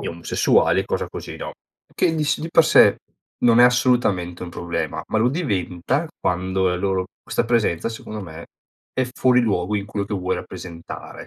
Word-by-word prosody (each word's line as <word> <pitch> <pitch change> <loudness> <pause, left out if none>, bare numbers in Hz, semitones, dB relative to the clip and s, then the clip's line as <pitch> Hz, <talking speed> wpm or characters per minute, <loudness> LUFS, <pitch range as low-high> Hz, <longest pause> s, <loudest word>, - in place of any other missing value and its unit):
gli - - -5
omosessuali 85 0 +2
e - - -4
cosa - - -2
così, - - -8
no? - - -6 0.4
Che 160 - +1
dis 150 -2 0
di 165 - -4
per 165 - +5
sé 155 - +6 0.4
non 120 -1 +5
è 125 - +9
assolutamente 120 -9 +2
un 90 - -8
problema 85 0 -3
ma 110 - +1
lo 120 +3 +3
diventa 125 - -1
quando 95 +1 0
la 90 - 0
loro 95 -1 -1
questa - - -1
presenza 115 -6 +1
secondo 110 -1 -7
me, 85 -2 -9 0.5
è 130 - 0
fuori 125 -1 +3
luogo 100 -3 0
in 100 - -4
quello 100 -1 -3
che 105 - -3
vuoi 95 -1 -1
rappresentare. 85 -1 -9
100 Hz, 180 wpm, -22 LUFS, 90-125 Hz, 0.5 s, è